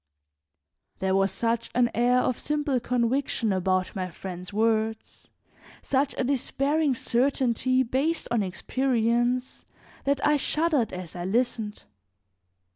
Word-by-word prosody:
There 190 Hz, 0 st, 0 dB
was 195 Hz, 0 st, +2 dB
such 230 Hz, 0 st, -1 dB
an 240 Hz, -1 st, +3 dB
air 245 Hz, +2 st, +3 dB
of 250 Hz, -, -1 dB
simple 295 Hz, -3 st, 0 dB
conviction 240 Hz, -2 st, 0 dB
about 185 Hz, 0 st, 0 dB
my 185 Hz, -1 st, -3 dB
friend's 180 Hz, +1 st, -8 dB
words, 220 Hz, +1 st, -1 dB, 0.5 s
such 275 Hz, +1 st, 0 dB
a -, -, +1 dB
despairing 280 Hz, +2 st, +1 dB
certainty 255 Hz, +1 st, +1 dB
based 275 Hz, +7 st, -1 dB
on 235 Hz, -2 st, +2 dB
experience, 240 Hz, +4 st, 0 dB, 0.4 s
that 280 Hz, 0 st, +2 dB
I 295 Hz, 0 st, +4 dB
shuddered 300 Hz, -4 st, +1 dB
as 180 Hz, -2 st, -7 dB
I 175 Hz, 0 st, -4 dB
listened. 225 Hz, 0 st, -1 dB
240 Hz, 120 wpm, -26 LUFS, 210-265 Hz, 0.5 s, I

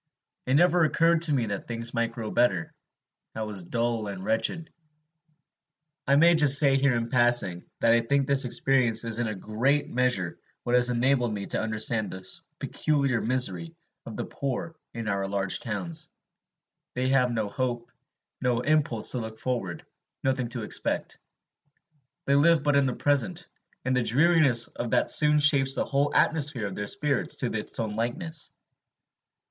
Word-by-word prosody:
It 130 Hz, -, +2 dB
never 175 Hz, +2 st, +4 dB
occurred 165 Hz, +1 st, +2 dB
to 165 Hz, -2 st, +3 dB
me 130 Hz, -5 st, +1 dB
that 100 Hz, -2 st, -5 dB
things 115 Hz, 0 st, -3 dB
might 115 Hz, -1 st, -1 dB
grow 115 Hz, -2 st, -6 dB
better. 100 Hz, -9 st, 0 dB, 0.6 s
I 110 Hz, -, -3 dB
was 100 Hz, -5 st, -3 dB
dull 115 Hz, +1 st, -2 dB
and 95 Hz, -2 st, -7 dB
wretched. 155 Hz, +9 st, -1 dB, 1.3 s
I 140 Hz, -, +4 dB
may 170 Hz, +4 st, +6 dB
just 150 Hz, -4 st, +6 dB
say 140 Hz, -2 st, +4 dB
here 135 Hz, -2 st, +2 dB
in 115 Hz, 0 st, -2 dB
passing, 120 Hz, -7 st, +1 dB
that 115 Hz, -, +4 dB
I 115 Hz, -, +3 dB
think 140 Hz, +4 st, 0 dB
this 140 Hz, 0 st, +3 dB
experience 125 Hz, -2 st, +1 dB
is 115 Hz, 0 st, -2 dB
in 120 Hz, -, -1 dB
a 110 Hz, -, -4 dB
great 125 Hz, +9 st, -1 dB
measure 125 Hz, -8 st, -1 dB, 0.2 s
what 120 Hz, -, -2 dB
has 125 Hz, 0 st, +3 dB
enabled 125 Hz, 0 st, +1 dB
me 100 Hz, -1 st, -5 dB
to -, -, -2 dB
understand 110 Hz, 0 st, -1 dB
the 95 Hz, 0 st, -9 dB, 0.3 s
peculiar 140 Hz, -6 st, -1 dB
misery 95 Hz, -9 st, -1 dB, 0.3 s
of -, -, -8 dB
the -, -, -3 dB
poor 140 Hz, +4 st, -4 dB, 0.2 s
in 115 Hz, -2 st, -6 dB
our 100 Hz, -1 st, -1 dB
large 100 Hz, -1 st, -1 dB
towns, 160 Hz, +9 st, -4 dB, 0.9 s
they 130 Hz, +1 st, -1 dB
have 125 Hz, -2 st, +2 dB
no 110 Hz, -3 st, -2 dB
hope, 120 Hz, +2 st, -4 dB, 0.5 s
no 125 Hz, -2 st, 0 dB
impulse 145 Hz, -5 st, +1 dB
to 125 Hz, -, -2 dB
look 110 Hz, -1 st, -7 dB
forward, 115 Hz, -10 st, -4 dB, 0.4 s
nothing 130 Hz, -2 st, 0 dB
to 120 Hz, -1 st, -6 dB
expect; -, -, -3 dB, 1.1 s
they 140 Hz, -, +1 dB
live 155 Hz, +2 st, +4 dB
but 145 Hz, -1 st, +2 dB
in 140 Hz, -1 st, +3 dB
the 125 Hz, -, -3 dB
present, 160 Hz, +5 st, 0 dB, 0.4 s
and 130 Hz, 0 st, 0 dB
the 125 Hz, -, +2 dB
dreariness 135 Hz, -1 st, +3 dB
of 120 Hz, -, -6 dB
that -, -, +2 dB
soon 150 Hz, -1 st, +5 dB
shapes 140 Hz, -2 st, +4 dB
the -, -, -1 dB
whole 140 Hz, +1 st, 0 dB
atmosphere 145 Hz, -8 st, +1 dB
of 100 Hz, -, -5 dB
their 105 Hz, +2 st, -5 dB
spirits 145 Hz, +3 st, -1 dB
to 120 Hz, -4 st, -2 dB
its 105 Hz, -, -4 dB
own 110 Hz, -2 st, -3 dB
likeness. 150 Hz, +8 st, -4 dB
125 Hz, 170 wpm, -26 LUFS, 110-140 Hz, 1.3 s, may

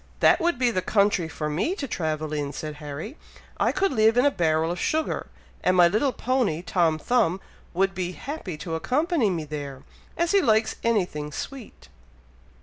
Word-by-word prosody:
'" -, -, -30 dB
"That -, -, +5 dB
would 345 Hz, -4 st, +1 dB
be 245 Hz, -1 st, +2 dB
the 185 Hz, -, 0 dB
country 200 Hz, -4 st, +2 dB
for 155 Hz, -1 st, -4 dB
me 170 Hz, -, -1 dB
to 290 Hz, -9 st, -4 dB
travel 155 Hz, -6 st, -2 dB
in," 145 Hz, -1 st, -2 dB
said 150 Hz, -1 st, -6 dB
Harry. 150 Hz, -, -7 dB, 0.4 s
"I -, -, +2 dB
could 390 Hz, +1 st, +1 dB
live 220 Hz, -1 st, +3 dB
in 250 Hz, -, +5 dB
a 285 Hz, -, +5 dB
barrel 160 Hz, -, +1 dB
of 175 Hz, -, -4 dB
sugar; 315 Hz, 0 st, -1 dB, 0.4 s
and 185 Hz, 0 st, +3 dB
my 175 Hz, -1 st, +8 dB
little 215 Hz, +9 st, +1 dB
pony, 245 Hz, -11 st, 0 dB
Tom 165 Hz, -2 st, +2 dB
Thumb, 195 Hz, 0 st, +1 dB, 0.4 s
would 195 Hz, +1 st, +2 dB
be 180 Hz, -1 st, -3 dB
happy 235 Hz, -, -6 dB
to 165 Hz, +2 st, -6 dB
accompany 270 Hz, -, +1 dB
me 170 Hz, -4 st, -2 dB
there, 145 Hz, -3 st, -6 dB, 0.3 s
as 340 Hz, 0 st, +1 dB
he 400 Hz, -, +5 dB
likes 220 Hz, -6 st, +2 dB
anything 180 Hz, -10 st, 0 dB
sweet." 260 Hz, -, -8 dB
185 Hz, 185 wpm, -25 LUFS, 155-250 Hz, 0.4 s, my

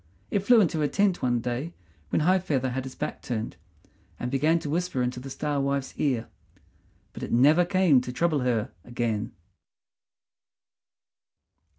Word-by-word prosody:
It -, -, +2 dB
flew 225 Hz, +4 st, +5 dB
into 165 Hz, -4 st, +1 dB
the 150 Hz, -, +2 dB
tent 200 Hz, +2 st, +1 dB
one 120 Hz, -2 st, +1 dB
day 125 Hz, +8 st, -3 dB, 0.3 s
when -, -, +1 dB
High 185 Hz, +4 st, +4 dB
feather 135 Hz, -8 st, -1 dB
had 130 Hz, +1 st, -3 dB
his 130 Hz, -, -8 dB
back -, -, -4 dB
turned, 115 Hz, -2 st, -4 dB, 0.6 s
and 125 Hz, -, -3 dB
began 150 Hz, +5 st, +3 dB
to 150 Hz, -, -5 dB
whisper 170 Hz, -6 st, 0 dB
into 125 Hz, 0 st, -2 dB
the 135 Hz, +2 st, -8 dB
Star 145 Hz, +1 st, -2 dB
wife's 140 Hz, -1 st, -1 dB
ear; 125 Hz, -6 st, 0 dB, 0.9 s
but -, -, -9 dB
it -, -, -5 dB
never 150 Hz, +9 st, +5 dB
came 180 Hz, -7 st, +4 dB
to 125 Hz, -, -5 dB
trouble 155 Hz, +2 st, +1 dB
her 120 Hz, -4 st, 0 dB
again. 115 Hz, -3 st, -2 dB
140 Hz, 160 wpm, -27 LUFS, 125-170 Hz, 0.9 s, flew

